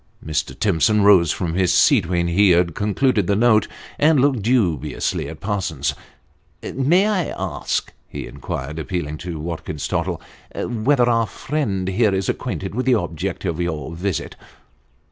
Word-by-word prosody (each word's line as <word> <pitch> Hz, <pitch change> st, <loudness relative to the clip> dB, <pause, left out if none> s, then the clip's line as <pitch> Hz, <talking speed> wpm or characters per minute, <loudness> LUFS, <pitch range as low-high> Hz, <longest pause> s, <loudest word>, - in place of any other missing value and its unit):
Mr. 75 Hz, -4 st, -2 dB
Timson 100 Hz, +2 st, +3 dB
rose 95 Hz, -6 st, +6 dB
from 85 Hz, -3 st, -2 dB
his 90 Hz, 0 st, +2 dB
seat 100 Hz, -, +4 dB
when 85 Hz, 0 st, 0 dB
he 95 Hz, +4 st, +4 dB
had 85 Hz, -1 st, +3 dB
concluded 105 Hz, -, +1 dB
the 100 Hz, -, +2 dB
note, 110 Hz, -1 st, +4 dB, 0.3 s
and 155 Hz, -1 st, +4 dB
looked 135 Hz, -3 st, +2 dB
dubiously 100 Hz, -, 0 dB
at -, -, -9 dB
Parsons 90 Hz, -9 st, -2 dB, 0.7 s
"May 165 Hz, +9 st, +2 dB
I 195 Hz, -6 st, +1 dB
ask," -, -, -3 dB, 0.2 s
he -, -, -6 dB
inquired, 75 Hz, +5 st, -6 dB
appealing 75 Hz, -3 st, -4 dB
to 85 Hz, -3 st, -6 dB
Watkins 80 Hz, -2 st, -5 dB
Tottle, -, -, -2 dB, 0.2 s
" -, -, -25 dB
whether 120 Hz, +2 st, +1 dB
our 115 Hz, -2 st, +2 dB
friend 105 Hz, -12 st, -2 dB
here 100 Hz, +1 st, +2 dB
is 95 Hz, -1 st, -1 dB
acquainted 95 Hz, -5 st, -3 dB
with 130 Hz, +4 st, -2 dB
the 130 Hz, -, +5 dB
object 85 Hz, -1 st, -3 dB
of 85 Hz, -2 st, -2 dB
your 80 Hz, -3 st, -3 dB
visit 95 Hz, +1 st, -3 dB
95 Hz, 155 wpm, -21 LUFS, 85-115 Hz, 0.7 s, rose